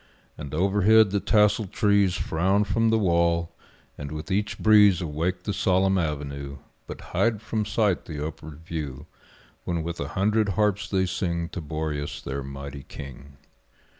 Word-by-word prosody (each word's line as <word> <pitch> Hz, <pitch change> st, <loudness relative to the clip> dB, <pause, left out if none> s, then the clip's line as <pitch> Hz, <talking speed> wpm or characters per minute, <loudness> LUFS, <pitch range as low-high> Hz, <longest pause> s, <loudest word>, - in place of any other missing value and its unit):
And 70 Hz, -2 st, -8 dB
overhead 100 Hz, +4 st, +4 dB
the 100 Hz, -, +1 dB
tasseled 105 Hz, -1 st, +2 dB
trees 100 Hz, -3 st, +2 dB
Frown 95 Hz, +4 st, +1 dB
from 115 Hz, +2 st, +1 dB
the 110 Hz, -, +3 dB
wall, 85 Hz, -4 st, +1 dB, 0.5 s
and 70 Hz, 0 st, -6 dB
with 75 Hz, +5 st, -6 dB
each 105 Hz, +2 st, -1 dB
breeze 105 Hz, -4 st, +5 dB
Awake 85 Hz, +3 st, -2 dB
the 100 Hz, -, -2 dB
solemn 95 Hz, 0 st, +2 dB
avenue, 70 Hz, -3 st, -4 dB, 0.3 s
But -, -, -8 dB
hide 115 Hz, -3 st, +2 dB
from 105 Hz, 0 st, -2 dB
sight 105 Hz, -3 st, 0 dB
the 75 Hz, -2 st, -5 dB
upward 80 Hz, 0 st, -8 dB
view, 75 Hz, -4 st, -5 dB, 0.6 s
When 85 Hz, -2 st, -2 dB
with 85 Hz, +1 st, -5 dB
a -, -, -3 dB
hundred 105 Hz, +2 st, +2 dB
harps 105 Hz, -1 st, +1 dB
they 95 Hz, -2 st, +1 dB
sing 85 Hz, -1 st, -2 dB
To 90 Hz, -, -6 dB
Boreas 75 Hz, -1 st, -4 dB
their 70 Hz, +1 st, -5 dB
mighty 70 Hz, +1 st, -7 dB
king. 70 Hz, +1 st, -11 dB
90 Hz, 155 wpm, -25 LUFS, 75-105 Hz, 0.6 s, breeze